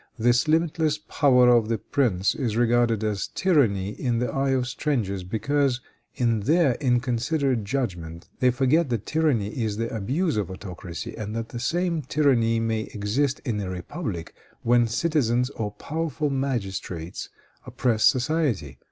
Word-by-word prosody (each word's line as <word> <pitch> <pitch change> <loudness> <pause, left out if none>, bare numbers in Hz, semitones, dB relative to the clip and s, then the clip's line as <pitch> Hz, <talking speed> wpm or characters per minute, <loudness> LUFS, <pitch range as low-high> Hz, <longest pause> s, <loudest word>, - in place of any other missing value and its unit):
This 120 +4 +3
limitless 160 -1 +1
power 130 -5 +3
of 115 -3 +4
the 115 - +1
prince 105 -6 +1
is 115 -6 -2
regarded 120 -2 +2
as 105 -2 -1
tyranny 115 - +2
in 120 +2 -2
the 120 -1 -1
eye 135 0 0
of 130 -2 +1
strangers, 120 -9 -2
because, 125 +7 0 0.4
in 115 -3 +1
their 145 - +3
inconsiderate 125 0 +1
judgment, 85 -9 -4
they 125 - +4
forget 135 +5 +2
that 115 -4 -2
tyranny 145 -11 +1
is 110 -3 -3
the 115 0 -3
abuse 135 - 0
of 105 -5 -1
autocracy, 90 -2 -7
and 105 0 -5
that 115 0 -4
the 120 - -6
same 170 +5 0
tyranny 125 -5 +2
may 115 -1 -1
exist 120 +7 0
in 115 -5 -1
a 95 -2 -3
republic 90 - -5 0.3
when 120 0 +4
citizens 125 -1 +1
or 110 -6 -3
powerful 155 +5 -3
magistrates 100 -10 -3 0.4
oppress 115 -4 0
society. 125 - +1
120 Hz, 145 wpm, -25 LUFS, 105-140 Hz, 0.4 s, of